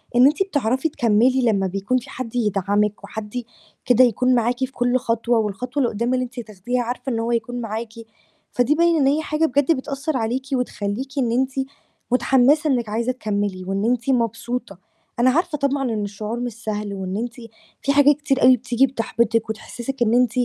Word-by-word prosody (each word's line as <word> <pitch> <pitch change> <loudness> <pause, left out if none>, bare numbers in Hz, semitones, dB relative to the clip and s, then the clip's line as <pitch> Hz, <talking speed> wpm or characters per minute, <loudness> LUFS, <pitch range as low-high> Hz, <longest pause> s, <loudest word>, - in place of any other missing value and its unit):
إن 245 +1 +7
أنتِ 300 +6 +2
بتعرفي 285 - 0
تكمّلي 245 +1 +2
لمّا 200 -5 +2
بيكون 195 +7 -1
فيه 245 - -7
حد 250 -2 -6
يدعمِك 205 -1 0
وحد 215 +1 -7
ي 245 -2 -3 0.4
كده 250 0 +5
يكون 250 +2 +3
معاكِ 240 +2 +1
في 260 0 -2
كُلّ 245 0 +1
خطوة، 235 -1 0
والخطوة 245 +6 -2
اللي 240 - +2
قدّام 235 +4 0
اللي 255 - +1
أنتِ 245 0 -9
تاخديها 230 +3 -3
عارفة 245 +3 -4
إن 230 - -1
هو 230 +1 -1
هيكون 240 +1 -2
معاكِ، 225 0 -5 0.6
فدي 250 +4 +2
باين 335 +1 +3
إن 275 -3 +3
هي 295 +3 +2
حاجة 310 +1 0
بجد 285 +2 +2
بتأثر 275 +2 -3
عليكِ، 245 +4 -2
وتخّليكِ 250 0 -2
إن 240 -3 +1
أنتِ 260 +2 +1 0.6
متحمسة 265 +4 +3
إنِك 240 -5 0
عايزة 230 +4 0
تكمّلي 205 -6 -3
وإن 195 +3 -2
أنتِ 245 +2 0
مبسوطة. 235 -3 -1 0.4
أنا 250 +2 +5
عارفة 320 +3 +1
طبعًا 280 0 0
إن 210 -1 -2
الشعور 210 +3 -5
مش 245 -1 -3
سهل، 210 -2 -4
وإن 190 0 -4
أنتِ 235 +1 -3 0.5
فيه 280 - +1
حاجات 285 +1 +6
كتير 285 -2 0
أوي 255 0 +7
بتيجي 250 +2 +2
بتحبطِك 230 -2 0
وتحسسِك 240 +4 -6
إن 230 -1 +3
أنتِ 245 -2 +4
245 Hz, 190 wpm, -22 LUFS, 220-260 Hz, 0.6 s, إن